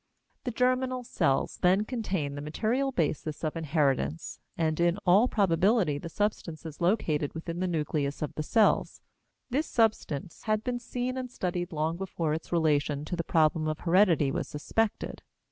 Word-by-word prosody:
The - - 0
germinal 255 +1 +1
cells 135 - 0
then 190 +4 +4
contain 190 - -2
the 145 - -5
material 230 - 0
basis 155 - -2
of 155 0 -1
inheritance, 155 -1 0 0.2
and 160 -1 0
in 170 +1 +3
all 195 +7 +6
probability 190 - +2
the 165 - -7
substance 170 -4 -2
is 160 +1 -8
located 165 -6 +1
within 165 +1 -5
the 185 - 0
nucleus 150 -4 -1
of 150 - -4
the - - -3
cells. 215 +8 +2 0.5
This 295 +5 0
substance 210 - 0
had 215 0 +1
been 245 -1 -2
seen 250 +1 -3
and 255 -1 -4
studied 175 -5 -3
long 160 +1 -1
before 170 -4 -2
its 160 - -5
relation 150 -3 +1
to 175 - -3
the 170 - -2
problem 155 -1 +2
of 155 0 -3
heredity 170 -5 +4
was - - -2
suspected. 210 +9 -2
170 Hz, 160 wpm, -29 LUFS, 155-215 Hz, 0.5 s, all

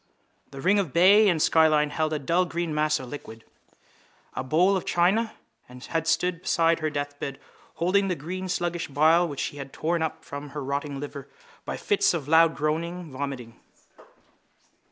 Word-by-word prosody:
The 135 - -9
ring 200 +5 +3
of 180 -9 -2
bay 200 +5 +6
and 170 -3 +1
skyline 155 -1 +3
held 155 +1 -1
a 155 - 0
dull 170 +6 +1
green 170 -1 -3
mass 150 0 +1
of 130 - -8
liquid. 115 -6 -9 0.9
A 130 - -3
bowl 160 +8 +3
of 190 - 0
white - - -17
china 195 +6 +2 0.3
had 140 +6 -4
stood 170 +1 +1
beside 165 -2 +2
her 155 -1 -1
deathbed 145 -1 -5 0.4
holding 195 +4 +2
the 180 - -1
green 185 +5 -6
sluggish 175 -2 -2
bile 160 +5 +3
which 145 -4 -7
she 145 - -4
had 135 -1 -8
torn 170 +1 -1
up 160 - -3
from 145 +1 -7
her 145 - -3
rotting 140 +1 -3
liver 145 -1 -8 0.4
by - - -4
fits 410 - +2
of 145 -5 -4
loud 165 +1 +5
groaning 165 +2 -3
vomiting. 130 -4 -6
160 Hz, 175 wpm, -26 LUFS, 145-175 Hz, 0.9 s, bay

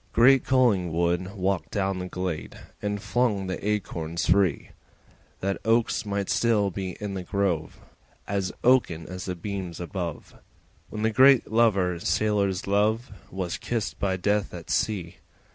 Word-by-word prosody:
Great 130 +3 +6
Collingwood 90 -7 +1
walked 95 -1 -1
down 95 -2 -1
the 90 - -4
glade 90 -3 -4 0.2
And 105 0 -2
flung 105 -1 0
the 95 -1 -4
acorns 85 -5 -2
free, 95 -4 +2 0.7
That 95 +1 -2
oaks 115 0 +1
might 100 -1 -1
still 105 -4 +2
be 95 -1 -5
in 105 -2 -4
the 95 - -3
grove 90 -4 -1 0.5
As 100 -2 -1
oaken 115 -11 +3
as 95 +1 -7
the 90 - -3
beams 95 -2 -5
above, 85 -2 -5 0.6
When 105 - -5
the 110 - +2
great 130 0 +5
Lover 100 -6 +3
sailors 100 +1 0
love 110 +5 +1 0.2
Was 90 -2 -4
kissed 115 -4 -3
by 95 -2 0
Death 105 +1 0
at 85 -2 -7
sea. 95 -6 -1
100 Hz, 145 wpm, -26 LUFS, 90-105 Hz, 0.7 s, Great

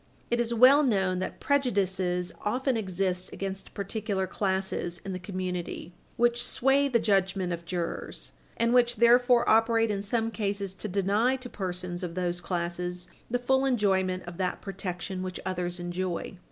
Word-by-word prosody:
It 240 - +2
is 235 -1 0
well 255 +5 +7
known 190 -9 +1
that 185 - -4
prejudices 190 -9 0
often 255 +4 0
exit 185 -3 -1
against 195 0 -6
particular 200 -1 -2
classes 190 -3 -2
in 195 - -3
the 185 - -4
community 180 -2 -4 0.2
which 240 0 +3
sway 270 +2 +2
the 250 -4 +3
judgment 195 -4 +1
of 170 0 -6
jurors 170 0 -4 0.3
and 230 +1 +2
which 240 -1 +4
therefore 240 +1 +5
operate 225 0 +4
in 200 -1 -2
some 225 +2 -1
cases 200 -3 -2
to 205 - -6
deny 205 +6 +2
to 255 -1 -7
persons 180 -2 -4
of 175 -2 -4
those 175 -1 -1
classes 175 0 -3 0.2
the 245 - +1
full 265 +2 +2
enjoyment 190 -7 +1
of 175 -1 -8
that 185 -1 -1
protection 190 -1 -5
which 185 -1 -4
others 180 -1 -2
enjoy. 175 +1 -3
195 Hz, 155 wpm, -28 LUFS, 180-235 Hz, 0.3 s, well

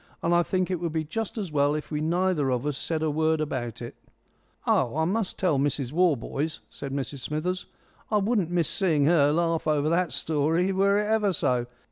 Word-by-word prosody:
And 170 - +2
I 175 - +5
think 185 +1 -1
it 180 - -1
would 170 -2 -3
be 160 -1 0
just 220 +9 -4
as 195 -6 -3
well 145 0 +2
if 155 - -5
we 150 0 -1
neither 170 -3 +1
of 125 +1 -1
us 150 -2 -1
said 160 +3 -2
a 155 - +1
word 160 +1 +1
about 130 -7 -3
it." - - -8 0.7
"Oh, 125 +5 +2
I 160 - +2
must 200 +3 -1
tell 165 -7 +1
Mrs 140 -2 -1
Warboys," 155 -2 0
said 140 - -7
Mrs 140 0 -4
Smithers. 155 +7 -3 0.4
"I 215 - +2
wouldn't 205 -4 +1
miss 175 -2 +1
seeing 160 -7 +2
her 145 -3 +4
laugh 165 0 0
over 150 0 +2
that 170 -1 +1
story 160 +6 +1
were 200 +1 +3
it 210 - +1
ever 210 -2 +2
so. 125 -6 0
160 Hz, 205 wpm, -26 LUFS, 145-180 Hz, 0.7 s, I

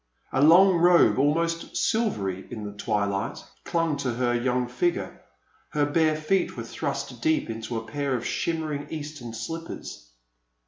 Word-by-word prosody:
A 135 - +2
long 175 +5 +7
robe, 175 -4 +5
almost 165 +4 0
silvery 100 - 0
in 110 -3 -6
the 105 - -5
twilight, 100 -1 -1 0.3
clung 165 -3 0
to 135 -3 -1
her 120 0 +1
3'oung 125 +1 0
figure; 350 - -2 0.5
her 145 -1 +2
bare 155 +1 +2
feet 165 +5 0
were - - -4
thrust - - -4
deep 315 - +1
into 115 +1 -4
a 115 - -5
pair 140 +2 -2
of 120 - -3
shim 165 +5 -1
mering 145 -2 -4
eastern 145 -6 -6
slippers. 165 - -7
145 Hz, 150 wpm, -26 LUFS, 120-165 Hz, 0.5 s, long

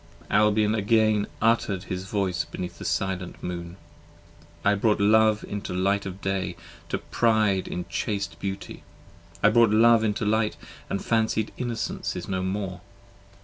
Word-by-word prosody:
Albion 105 +1 +3
again 110 -1 +2 0.2
utter'd 110 -5 +2
his 95 -1 -5
voice 100 -4 -1
beneath 90 -1 -7
the - - -7
silent 95 -2 -2
Moon. 85 0 -5 0.9
I 100 - +5
brought 105 +1 +2
Love 110 +1 +4
into 100 -3 -4
light 100 +2 +1
of 95 +1 -8
day 95 -2 -2 0.3
to - - 0
pride 110 -5 +1
in 90 - -4
chaste 100 +2 -3
beauty, 95 0 -5 0.6
I 105 - +7
brought 115 0 +5
Love 115 +1 +5
into 105 0 0
light 110 +1 +1 0.3
& 100 - -3
fancied 110 -1 0
Innocence 120 -2 -3
is 90 - -5
no 95 -1 -1
more. 95 -1 -3
100 Hz, 145 wpm, -26 LUFS, 95-110 Hz, 0.9 s, I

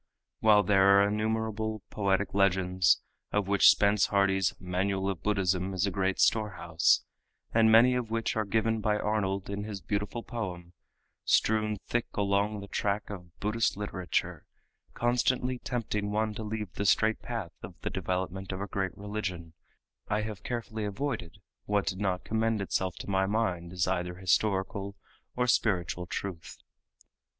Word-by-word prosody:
While 105 -2 +5
there 100 -1 +5
are 100 - +4
innumerable 110 0 -2
poetic 100 -1 0
legends 95 -2 +3 0.3
of 105 -2 0
which 100 0 +6
Spence 100 0 +4
Hardy's 95 -2 +2
"Manual 95 +2 -1
of 90 - -7
Buddhism" 95 -2 0
is 90 - +1
a 100 - -1
great 95 0 -1
storehouse, 90 -6 +2 0.5
and 110 -1 +5
many 120 +3 +7
of 125 -3 -2
which 115 0 -1
are 110 - +1
given 110 +2 +1
by 105 0 +1
Arnold 100 -3 -1
in 100 +1 -4
his 105 -2 -5
beautiful 105 +4 -3
poem 90 -7 -6 0.5
strewn 110 -1 +2
thick 120 -1 -1
along 100 +1 0
the 100 - -8
track 100 +1 -2
of 90 -4 -10
Buddhist 105 0 0
literature, 95 -3 -3 0.5
constantly 125 +1 +1
tempting 105 -5 -2
one 110 +1 0
to 110 - -6
leave 105 -3 -4
the 100 - -3
straight 110 +2 +3
path 115 -8 -5
of - - -10
the - - -3
development 95 +1 -3
of 95 - -4
a 100 - -2
great 95 -3 -3
religion, 95 -5 -5 0.5
I 105 +1 0
have 105 -2 -6
carefully 115 -1 -4
avoided 100 - -3 0.3
what 100 -3 +1
did 95 +3 -2
not 95 -3 -1
commend 110 0 0
itself 95 -2 -1
to - - -10
my 95 -1 +1
mind 95 -5 -1
as 90 -1 0
either 90 -1 -1
historical 95 +2 0 0.4
or 125 - +1
spiritual 90 -7 +1
truth. 90 -2 -5
100 Hz, 155 wpm, -29 LUFS, 95-110 Hz, 0.5 s, many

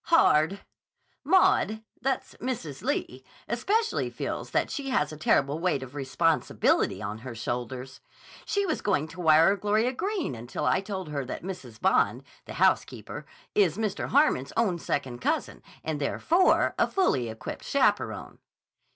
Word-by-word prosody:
"Hard. 195 - +4 0.6
Maud—that's 265 - +1
Mrs. 220 - -4
Lee—especially 245 - -2
feels - - -4
that - - 0
she 280 -2 -4
has 255 - +1
a - - -7
terrible 145 0 +2
weight 170 -6 0
of 130 0 -10
responsibility 145 +4 +1
on 105 +2 -4
her 120 0 -8
shoulders. 125 +3 -5 0.4
She 405 0 0
was 320 - -1
going 155 -7 +1
to 180 - -8
wire 160 +4 +6
Gloria 215 +5 +1
Greene 390 - -2
until 120 +1 -5
I 185 - +3
told 190 -4 -5
her 145 -2 -2
that 125 - -6
Mrs. 130 - -7
Bond, - - +2 0.2
the - - -8
housekeeper, - - 0 0.3
is 190 -4 +3
Mr. 215 -3 -2
Harmon's 265 - +2
own 200 -7 +2
second 130 -6 -3
cousin - - -1 0.2
and 155 -2 -3
therefore, 340 - +3
a - - +4
fully 135 - +1
equipped 110 0 -7
chaperon." - - 0
170 Hz, 140 wpm, -27 LUFS, -, 0.6 s, wire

